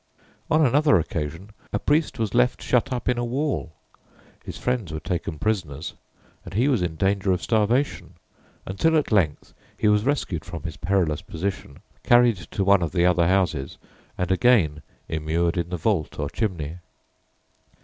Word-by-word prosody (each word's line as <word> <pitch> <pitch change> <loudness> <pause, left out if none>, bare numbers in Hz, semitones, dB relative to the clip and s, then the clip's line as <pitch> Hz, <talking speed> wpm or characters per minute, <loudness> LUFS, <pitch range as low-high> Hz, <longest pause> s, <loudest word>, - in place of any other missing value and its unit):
On 155 0 +4
another 140 -4 +4
occasion 80 +4 -4 0.2
a - - 0
priest 150 +8 +1
was 110 -4 -2
left 125 +1 +2
shut 125 +2 +1
up 125 -2 -3
in 125 -1 +1
a - - -1
wall; 130 - -2 0.7
his - - -7
friends 125 -9 -2
were 80 - -4
taken 80 0 -3
prisoners, 80 -6 -2 0.5
and - - -10
he 120 +6 +3
was 130 -9 +2
in 85 -2 -2
danger 95 +2 +1
of 90 - 0
starvation, 115 +5 0 0.5
until 160 +12 +2
at 150 - -1
length 90 -8 +1 0.2
he - - +1
was 105 0 +3
rescued 115 - -1
from 80 -5 -8
his 80 -2 -6
perilous 85 -3 0
position, 80 -5 -5 0.2
carried 120 -3 +5
to 90 +3 -4
one 100 -1 +4
of 85 - -2
the 85 -1 +3
other 90 -2 +3
houses, 85 -7 0 0.4
and 90 +1 -1
again 95 -8 +3 0.3
immured 80 +2 -1
in 85 -1 -2
the 90 - -3
vault 80 -2 -1
or 70 0 -3
chimney. 85 -7 -3
95 Hz, 165 wpm, -24 LUFS, 80-120 Hz, 0.7 s, carried